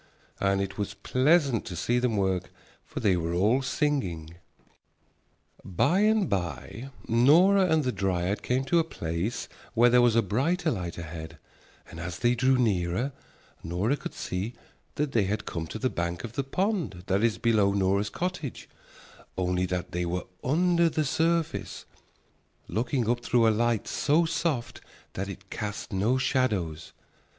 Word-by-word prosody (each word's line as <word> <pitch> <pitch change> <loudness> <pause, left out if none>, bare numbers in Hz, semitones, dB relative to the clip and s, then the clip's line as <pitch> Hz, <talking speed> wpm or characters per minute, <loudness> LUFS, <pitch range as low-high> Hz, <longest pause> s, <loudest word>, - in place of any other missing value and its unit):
And 100 0 +2
it 100 +1 -4
was 100 -1 -3
pleasant 135 - +2
to 90 - -6
see 120 +8 +1
them 120 -3 0
work, 95 -2 0 0.3
for - - -7
they 95 -3 +3
were 85 0 -2
all 110 +9 +3
singing. 130 - -1 1.3
By 140 - +1
and 215 -2 +3
by 95 - -4 0.2
Nora 170 - +5
and 160 -2 +2
the 130 - 0
dryad 95 -1 -1
came 130 +2 0
to 170 +5 +3
a - - +3
place 85 - -3 0.3
where 120 +1 +5
there 125 0 +6
was 120 -2 +4
a 115 - +4
brighter 160 - 0
light 90 -6 -4
ahead, 80 -1 -7 0.5
and 85 - -10
as 85 0 -5
they 120 +1 +2
drew 130 +2 +3
nearer 105 +1 0 0.5
Nora 95 - 0
could - - -8
see 95 +6 -4 0.4
that 150 -1 -1
they 110 -6 +2
had 105 +2 -2
come 80 -2 -4
to 110 - -6
the 130 - 0
bank 85 -6 -3
of 120 -2 -6
the 140 - -1
pond 175 - -2
that 100 +2 +1
is 115 -5 +2
below 105 -2 +3
Nora's 100 +1 +1
cottage, 180 -6 -4 0.7
only 90 0 0
that 90 0 -3
they 90 0 -2
were 90 +1 -2 0.2
under 170 +4 +3
the 155 -1 -1
surface, 165 +3 -1 0.8
looking 120 +1 -1
up 120 +1 0
through 115 -2 +3
a - - +6
light 115 0 0
so 155 +4 +2
soft 160 -6 -2 0.3
that 95 +2 -4
it 100 0 -10
cast 105 -1 -5
no 105 +7 +2
shadows. 105 - -1
115 Hz, 160 wpm, -27 LUFS, 95-135 Hz, 1.3 s, there